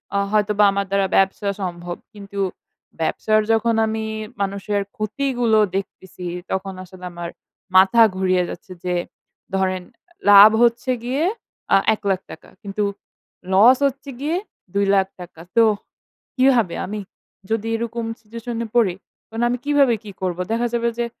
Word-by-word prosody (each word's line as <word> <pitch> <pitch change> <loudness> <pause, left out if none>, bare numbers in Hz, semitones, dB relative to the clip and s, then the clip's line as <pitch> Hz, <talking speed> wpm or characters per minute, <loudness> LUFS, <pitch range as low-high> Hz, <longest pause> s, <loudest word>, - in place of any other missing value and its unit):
অ - - +3
হয়তোবা 210 0 +2
আমার 200 0 -1
দ্বারা 195 -1 +2
ব্যবসা 195 +2 +2
সম্ভব। 175 -1 -4 0.2
কিন্তু 200 -1 -8 0.6
ব্যবসার 215 +6 +2
যখন 225 +1 +2
আমি 220 0 -2 0.4
মানুষের 200 +1 -1 0.2
ক্ষতিগুলো 230 0 +1 0.2
দেখতেছি 190 -2 -6 0.3
তখন 190 0 -2
আসলে 180 0 -12
আমার 170 0 -6 0.5
মাথা 190 +5 +6 0.2
ঘুরিয়ে 185 -1 +2
যাচ্ছে। - - -9
যে 180 -1 -1 0.6
ধরেন 185 -1 0 0.5
লাভ 205 +1 +10
হচ্ছে 240 +2 +2
গিয়ে 265 +6 -1 0.5
অ্যা - - +6 0.2
এক 215 - -6
লাখ 190 -2 +2
টাকা - - -12
কিন্তু 205 +1 -3 0.7
লস 230 +7 +7
হচ্ছে 275 +1 -6
গিয়ে 305 +5 -1 0.4
দুই 200 0 +2
লাখ 190 -1 +3
টাকা। 170 -2 -11 0.2
তো 230 - +8 0.7
কিভাবে? 250 -8 +3
আমি 210 +2 -5 0.5
যদি 225 0 0
এরকম 230 0 -3
সিচুয়েশনে 230 +1 -5
পড়ি 200 -7 +3 0.3
তাহলে 225 +2 -1
আমি 245 - 0
কিভাবে 285 -4 +4
কি 205 - -8
করবো? 180 -1 -2
দেখা 235 +1 +1
যাবে 235 0 +1
যে 240 - 0
210 Hz, 140 wpm, -21 LUFS, 190-235 Hz, 0.7 s, লাভ